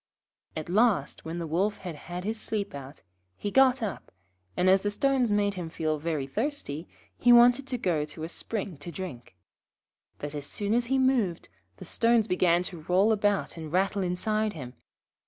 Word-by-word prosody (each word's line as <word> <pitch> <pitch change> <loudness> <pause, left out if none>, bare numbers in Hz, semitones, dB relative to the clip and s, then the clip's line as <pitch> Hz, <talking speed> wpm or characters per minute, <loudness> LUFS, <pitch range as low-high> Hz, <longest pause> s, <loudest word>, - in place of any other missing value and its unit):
At 155 - -4
last, 195 - +1
when 165 +1 -4
the 170 - -3
Wolf 190 +7 0
had 175 -4 -7
had 175 +4 -7
his 220 +2 -3
sleep 205 -2 -3
out, 140 0 -9 0.3
he 205 - -3
got 265 -1 +4
up, 200 -5 -5 0.5
and, 180 - +2
as 190 +1 +5
the 205 - 0
stones 260 +1 +1
made 205 -1 +2
him 175 -4 -5
feel 155 -2 -2
very 155 -3 -2
thirsty, 180 - -4 0.3
he 245 - +5
wanted 245 +3 +6
to 255 -1 -2
go 170 -9 0
to 155 +1 -8
a - - -2
spring 195 0 -5
to 145 +4 -8
drink. 150 - -8 0.8
But 145 0 -6
as 145 -1 -5
soon 205 0 -2
as 240 0 +1
he 270 +2 +2
moved 250 -10 +1 0.3
the - - -10
stones 230 -1 +2
began 175 -2 +3
to 175 -3 -7
roll 185 +7 +3
about 205 -4 0
and 160 -2 -7
rattle 195 +3 +1
inside 215 +4 0
him. 130 -6 -8
190 Hz, 185 wpm, -28 LUFS, 160-220 Hz, 0.8 s, wanted